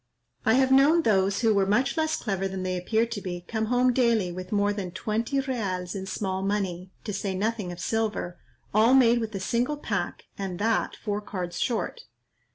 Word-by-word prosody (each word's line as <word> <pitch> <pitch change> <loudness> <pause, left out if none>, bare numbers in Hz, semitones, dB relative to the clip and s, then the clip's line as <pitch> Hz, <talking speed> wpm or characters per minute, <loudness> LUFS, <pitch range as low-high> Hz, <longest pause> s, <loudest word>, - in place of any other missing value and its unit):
I 220 - +6
have 260 0 +3
known 290 +5 +6
those 195 -3 +2
who 225 -2 +4
were 195 -1 +2
much 250 +7 +2
less 315 -1 +1
clever 195 -3 -2
than 190 -1 -4
they 185 0 -1
appear 220 +6 +1
to 230 -3 -5
be, 175 -2 -5
come 220 -1 -1
home 250 +2 +3
daily 230 -7 +2
with 185 +1 -7
more 205 0 +2
than 200 -3 -4
twenty 225 +8 -1
reals 195 -9 -3
in 190 -1 -5
small 190 -1 -2
money, 190 -3 -2
to 210 - -4
say 195 -1 -2
nothing 210 -1 -1
of 175 - -8
silver, 215 -6 -2 0.3
all 225 +5 +5
made 240 -2 +5
with 225 -2 -4
a - - -2
single 240 +9 0
pack, 205 -10 -3 0.2
and 190 -3 -3
that 220 +3 0
four 210 -1 -3
cards 185 -4 -5
short. 225 -7 -1
210 Hz, 195 wpm, -27 LUFS, 190-235 Hz, 0.3 s, I